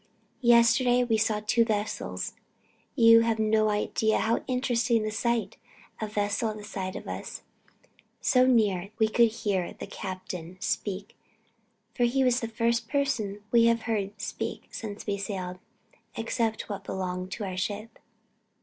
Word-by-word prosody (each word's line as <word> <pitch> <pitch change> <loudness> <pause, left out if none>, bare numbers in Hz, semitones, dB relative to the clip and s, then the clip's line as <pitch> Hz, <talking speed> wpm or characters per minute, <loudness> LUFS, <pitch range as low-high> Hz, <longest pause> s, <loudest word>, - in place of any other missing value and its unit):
Yesterday 240 +1 +5
we 235 -2 +1
saw 215 -1 +1
two 230 +2 +4
vessels.... 215 -2 -2 0.6
You 230 -2 +7
have 230 -1 +1
no 215 0 +3
idea 215 +1 +1
how 225 +1 +1
interesting 240 -3 +1
the 215 - -2
sight 235 +1 -1 0.4
a 215 - -1
vessel 210 +1 0
at 215 - -5
the 210 - -9
side 190 -2 -5
of - - -7
us, - - -6 0.8
so 255 0 +4
near 205 -7 +2
we 220 - +4
could 235 +1 +4
hear 200 -5 -2
the - - -8
captain 185 -2 -6
speak 200 -1 -3 0.8
for 245 - +2
he 265 +3 +2
was 250 -1 +3
the 230 - -3
first 230 +1 0
person 220 -8 -1
we 235 -1 +6
have 230 0 +3
heard 205 -2 -2
speak - - -5
since 210 -2 -6
we 200 -1 -2
sailed, 185 -2 -4 0.6
except 225 -1 -1
what 200 -2 -5
belong 185 -1 -3
to 205 +3 -5
our 190 -2 -4
ship. 205 +4 -4
220 Hz, 150 wpm, -28 LUFS, 200-235 Hz, 0.8 s, You